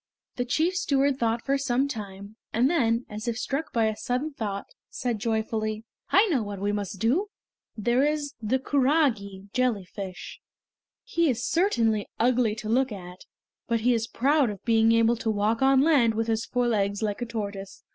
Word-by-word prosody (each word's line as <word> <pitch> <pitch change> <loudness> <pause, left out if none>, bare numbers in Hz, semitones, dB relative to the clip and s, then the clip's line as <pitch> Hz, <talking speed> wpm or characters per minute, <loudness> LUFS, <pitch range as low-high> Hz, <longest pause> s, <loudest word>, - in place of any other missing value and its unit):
The 245 - -1
chief 315 +8 +1
steward 280 -6 +1
thought 230 0 0
for 275 0 +1
some 270 0 +1
time, 205 -4 -7 0.2
and 250 +6 +2
then, 235 -7 +1
as 215 +2 -7
if 235 -1 -1
struck 290 +5 -3
by 230 -2 +2
a 220 -1 0
sudden 255 +7 -2
thought, 205 -6 -4 0.2
said 240 -4 -3
joyfully: 220 -1 -2 0.3
"I 395 +4 +5
know 280 -9 +2
what 205 -2 -5
we 205 +1 0
must 205 -1 -3
do! 260 - +1 0.5
There 240 +5 +2
is 295 -1 -1
the 220 +4 +1
kurage 255 -9 0
(jellyfish). 200 -6 -3 0.6
He 335 -10 +1
is 245 0 -1
certainly 230 - +1
ugly 235 -2 +2
to 215 -1 -7
look 255 +3 +2
at, 180 -2 -9 0.4
but 230 -2 0
he 245 +2 +3
is 230 -1 -1
proud 280 +1 +2
of 200 -3 -8
being 225 -1 +4
able 230 +1 +3
to 225 - -2
walk 215 +2 0
on 270 0 +5
land 270 -8 +4
with 225 +1 0
his 225 0 -1
four 245 -1 0
legs 205 -2 0
like 210 +1 -2
a - - -1
tortoise. 200 -4 -6
230 Hz, 180 wpm, -26 LUFS, 215-265 Hz, 0.6 s, I